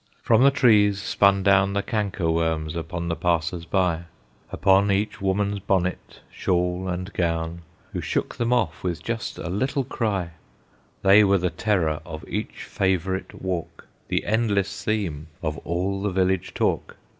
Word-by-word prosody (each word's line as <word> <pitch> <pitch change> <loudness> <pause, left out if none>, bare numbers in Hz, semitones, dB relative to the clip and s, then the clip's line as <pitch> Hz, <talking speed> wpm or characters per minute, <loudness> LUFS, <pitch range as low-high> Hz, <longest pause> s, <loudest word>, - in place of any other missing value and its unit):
From 115 0 +4
the 135 - +7
trees 105 -7 +4
spun 100 0 +3
down 100 0 +4
The 100 0 0
canker 100 -6 -1
worms 80 -1 -1
upon 85 +1 -4
the 85 - -1
passers 85 0 -1
by, 85 -2 0 0.5
Upon 95 +1 +3
each 100 +2 -1
woman's 100 +1 0
bonnet, 95 -2 -2
shawl, 90 +1 0
and 90 +2 -4
gown, 85 -1 -1 0.3
Who - - -2
shook - - -2
them 120 0 0
off 120 -4 0
with 85 -2 -3
just 115 -1 -3
a - - -5
little 130 - -1
cry; 105 -9 -2 0.7
They 100 +2 +7
were 100 -1 +4
the 90 -1 -1
terror 80 -8 0
of 80 -2 -9
each - - -4
favorite 95 0 -2
walk, 90 -3 -4 0.2
The - - -1
endless 105 -3 0
theme 90 -8 -2 0.2
of 75 -3 -2
all 95 +5 -2
the 105 - 0
village 95 -1 0
talk. - - -1
95 Hz, 155 wpm, -24 LUFS, 85-100 Hz, 0.7 s, the